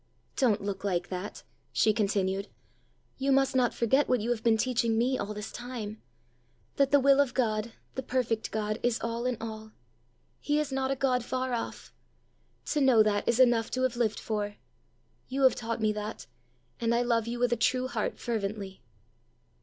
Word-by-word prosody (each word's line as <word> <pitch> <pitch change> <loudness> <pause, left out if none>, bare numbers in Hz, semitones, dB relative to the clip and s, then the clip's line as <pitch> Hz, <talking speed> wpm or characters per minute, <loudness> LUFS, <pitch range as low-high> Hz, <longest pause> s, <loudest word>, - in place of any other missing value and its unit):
Don't 225 -7 +2
look 200 -1 -4
like 180 -3 -1
that," 185 +2 -6 0.3
she 215 - +3
continued; 200 -2 0 0.7
"you 275 +1 +1
must 270 0 +3
not 250 -2 +3
forget 265 +5 +2
what 250 - +3
you 225 +3 -1
have 235 -2 -1
been 225 -1 +4
teaching 230 -1 +1
me 250 +3 +2
all 205 -3 -3
this 210 +1 -6
time 230 -4 -6 0.8
that 275 -2 +4
the 285 - +5
will 275 +1 +5
of 275 -3 +2
God, 225 -2 0 0.2
the 265 - -3
perfect 245 -3 -1
God, 215 0 -2
is 240 -2 +1
all 230 +1 -2
in 250 -2 -1
all! 220 -1 -7 0.7
He 295 0 +1
is 300 -2 -2
not 265 0 -1
a 275 - +1
God 255 -2 +1
far 255 +1 -2
off: 235 - -5 0.8
to 300 - +1
know 255 -5 +6
that 205 -1 0
is 235 +1 +2
enough 240 -3 +4
to 255 - -1
have 255 -2 +1
lived 230 -3 0
for! 205 -2 -3 0.7
You 270 +1 -1
have 260 - +7
taught 230 -1 -4
me 215 -1 +2
that, 210 +1 -5 0.5
and 235 0 +1
I 240 - +2
love 230 -2 +1
you 240 +1 -3
with 245 0 +2
a - - +3
true 255 +3 +1
heart 225 -4 -2
fervently." 200 - -4
235 Hz, 185 wpm, -29 LUFS, 215-255 Hz, 0.8 s, have